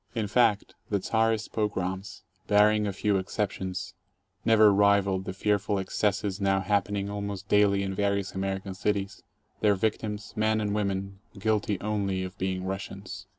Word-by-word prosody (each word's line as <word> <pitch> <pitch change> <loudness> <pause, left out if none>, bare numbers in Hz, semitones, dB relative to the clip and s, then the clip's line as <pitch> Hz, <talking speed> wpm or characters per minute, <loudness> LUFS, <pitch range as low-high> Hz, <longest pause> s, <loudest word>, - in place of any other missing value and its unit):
In 110 -2 0
fact, 105 -1 +2 0.2
the 100 - +1
Czarist 110 +2 0
pogroms, 95 -3 -3 0.2
barring 105 0 +4
a - - -1
few 100 +1 +1
exceptions, 95 -1 -3 0.5
never 110 -2 +6
rivaled 100 -1 +3
the - - -3
fearful 100 +1 0
excesses 100 +1 -1
now 95 0 +2
happening 100 0 0
almost 100 -1 -5
daily 100 -1 +3
in 95 0 -2
various 100 -1 -1
Amer 95 0 -1
ican 95 -1 -7
cities, 100 -1 -2 0.4
their 105 -2 +3
victims, 105 +1 -2
men 110 0 +2
and 105 -1 -1
women, 100 -1 -2 0.2
guilty 105 -1 0
only 100 -3 -1
of 95 0 -6
being 95 0 -2
Russians. 95 0 -6
100 Hz, 150 wpm, -28 LUFS, 95-105 Hz, 0.5 s, never